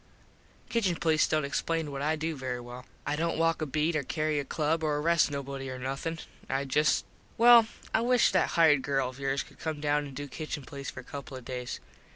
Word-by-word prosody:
Kitchen 200 -7 +1
police 160 -1 +2
dont 155 -1 +1
explain 160 +2 -1
what 140 0 -4
I 155 +2 +1
do 160 +1 -2
very 130 -2 -4
well. 120 +1 -9 0.2
I 145 - 0
dont 165 +1 -1
walk 165 0 +2
a 155 - -1
beet 155 +4 0
or 155 - +2
carry 155 +2 -1
a - - -1
club 155 +3 -1
or 150 -1 +1
arrest 165 +2 +3
nobody 140 -1 -5
or 130 - -5
nothin. 135 +6 -3 0.3
I 135 +1 0
just 150 +3 +2 0.3
well 235 -1 +8 0.3
I 220 - +3
wish 245 0 +4
that 185 - +3
hired 155 -4 +6
girl 135 -1 0
of 130 +1 -12
yours 135 0 0
could - - -19
come 160 -2 -3
down 145 0 +1
an 135 - -11
do 145 +1 -5
Kitchen 150 +1 -5
police 140 +1 -7
for - - -8
a - - -18
couple 140 -1 -8
of 125 - -11
days. 125 -1 -5
150 Hz, 220 wpm, -29 LUFS, 135-160 Hz, 0.3 s, well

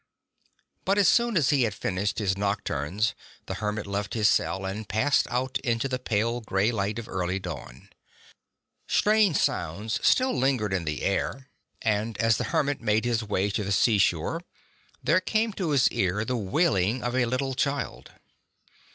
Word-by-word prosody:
But 195 +1 +1
as 200 -3 +5
soon 235 -1 +3
as 150 -3 +3
he 140 -2 +3
had 110 -4 0
finished 100 +1 -2
his 95 -3 0
nocturns 100 0 -1 0.3
the - - -4
hermit 105 0 -2
left 100 +2 -3
his 110 -2 +3
cell 95 -1 +1
and 100 +2 -5
passed 135 +6 +2
out 130 +2 -1
into 120 -1 -1
the 130 -1 -2
pale 115 0 -1
gray 105 0 +1
light 105 -1 -2
of 115 -1 -6
early 90 0 -2
dawn. 80 -9 -8 1.0
Strange 210 -6 +3
sounds 105 +8 -1
still 260 0 +3
lingered 125 -6 +1
in 90 -3 -1
the 75 -1 -3
air, 130 +7 -2 0.3
and 110 0 0
as 115 -2 +3
the 125 - -2
75 - - -6
hermit 145 -3 +1
made 110 0 +1
his 120 -2 0
way 100 -1 0
to 105 - -1
the 100 - -3
seashore 105 0 +2 0.6
there 165 +8 +3
came 220 +1 0
to 185 -5 -2
his 140 -4 +4
ear 95 +3 0
the 125 - -1
wailing 115 - +1
of 120 +1 -2
a 125 -2 +2
little 130 +2 -1
child. 140 +2 -2
110 Hz, 170 wpm, -26 LUFS, 100-130 Hz, 1.0 s, as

